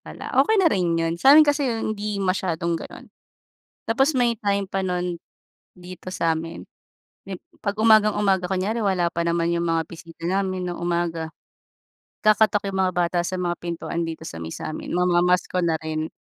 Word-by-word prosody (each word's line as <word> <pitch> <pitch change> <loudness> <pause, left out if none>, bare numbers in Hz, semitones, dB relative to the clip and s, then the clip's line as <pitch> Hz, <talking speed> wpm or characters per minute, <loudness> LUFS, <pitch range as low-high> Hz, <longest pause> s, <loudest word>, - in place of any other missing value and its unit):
pala, - - -9
okey 440 0 +3
na 380 -4 +5
rin 175 -3 +1
yun, 165 0 0
sa'min 295 +3 +8
kasi 290 -2 +1
yun 225 -2 -2
hindi 210 0 -4
masyadong 170 -3 -1
gano'n. - - -10 0.8
Tapos 270 +7 +3
may 245 -3 +1
time 200 -3 -1
pa 195 0 -2
nun 180 -1 -2 0.6
dito 180 0 -11
sa'min, 165 -1 -2 0.7
yung 190 -2 -5 0.2
'pag 200 0 -2
umagang-umaga 210 -4 +3
kunyari 195 +5 -1
wala 185 -4 +1
pa 170 - -1
naman 170 0 0
yung 170 0 -1
mga 165 0 +1
bisita 165 0 -13
namin 185 0 -1
ng 175 - -4
umaga, 170 -2 -2 0.9
kakatok 215 -1 +3
yung 190 - -3
mga 185 -1 +1
bata 175 0 +1
sa 185 - -3
mga 175 -1 -1
pintuan 170 0 -4
dito 160 0 -6
sa 85 - -7
may 80 0 -6
sa - - -5
amin 155 - -5
mamamasko 180 +1 +2
na 170 -2 +1
rin, 155 0 -3
180 Hz, 170 wpm, -23 LUFS, 170-205 Hz, 0.9 s, sa'min